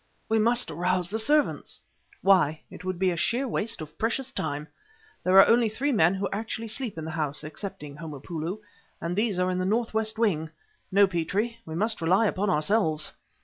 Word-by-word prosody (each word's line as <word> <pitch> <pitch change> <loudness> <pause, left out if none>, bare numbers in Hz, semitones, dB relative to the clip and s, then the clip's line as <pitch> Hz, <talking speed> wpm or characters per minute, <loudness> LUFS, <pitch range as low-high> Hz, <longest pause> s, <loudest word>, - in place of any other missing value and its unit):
"We 220 0 +3
must 235 +3 +3
arouse 180 +2 0
the 220 - -1
servants!" 295 +7 +1 0.4
"Why? 170 -6 +4
It - - -10
would 185 -1 -3
be 185 -1 +1
sheer 245 +10 0
waste 225 -5 -2
of 155 -1 -10
priceless 250 +4 -1
time. 150 - -3 0.6
There 185 +1 +4
are - - +10
only 230 -1 +4
three 265 +7 -1
men 180 -6 +4
who 195 +1 -1
actually 220 +2 -4
sleep 230 -4 -2
in 160 - -5
the 160 - -4
house 150 -2 -2
(excepting 150 -3 -7
Homopoulo) 165 +5 -5 0.4
and 170 +1 -3
these 210 -2 +1
are 180 0 +1
in 180 - -1
the - - 0
northwest 220 +1 0
wing. 170 -9 +1 0.4
No, 200 +1 +6
Petrie; 195 +6 -2
we 160 - -5
must 215 +2 0
rely 185 +7 +3
upon 205 -1 0
ourselves." 155 -1 +1
190 Hz, 185 wpm, -27 LUFS, 165-220 Hz, 0.6 s, are